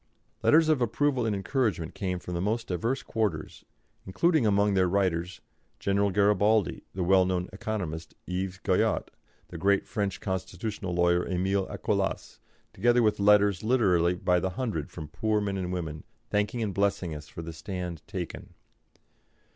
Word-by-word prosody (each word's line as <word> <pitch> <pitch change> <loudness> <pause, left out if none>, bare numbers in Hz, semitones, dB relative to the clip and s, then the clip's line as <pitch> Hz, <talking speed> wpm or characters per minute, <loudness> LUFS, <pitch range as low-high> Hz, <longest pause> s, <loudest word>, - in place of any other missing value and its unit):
Letters 160 +1 +5
of 155 -5 +3
approval 125 +1 +1
and 105 - 0
encouragement 100 - -1
came 90 -2 -2
from 90 0 -7
the 85 - -1
most 110 +4 -1
diverse 115 +9 -2
quarters, 100 -9 -2 0.4
including 155 - +2
among 100 0 +3
their 95 -1 +3
writers 90 -2 0 0.4
General 100 +1 +1
Garibaldi, 105 +1 +2
the 95 - -1
well 95 +1 +5
known 90 -1 -1
economist, 90 -6 -4
Yves 95 +1 -3
Guyot, - - +1 0.4
the 85 - -7
great 100 +2 +2
French 100 -3 -2
constitutional 95 0 -4
lawyer, 85 0 +3
Emile 95 +1 0
Acollas, - - -2 0.3
together 120 0 +3
with 105 -2 +2
letters 100 -1 +4
literally 95 -8 +3
by 90 -1 +2
the 95 - -1
hundred 95 - -3
from 80 -3 -8
poor 110 +7 0
men 100 -1 -2
and 90 -2 -3
women 80 -4 -4 0.3
thanking 105 +3 0
and 100 -3 -2
blessing 100 -3 0
us 75 0 -8
for 85 - -8
the 80 0 -7
stand 85 +1 -5
taken. 95 -5 -6
95 Hz, 155 wpm, -28 LUFS, 90-105 Hz, 0.4 s, Letters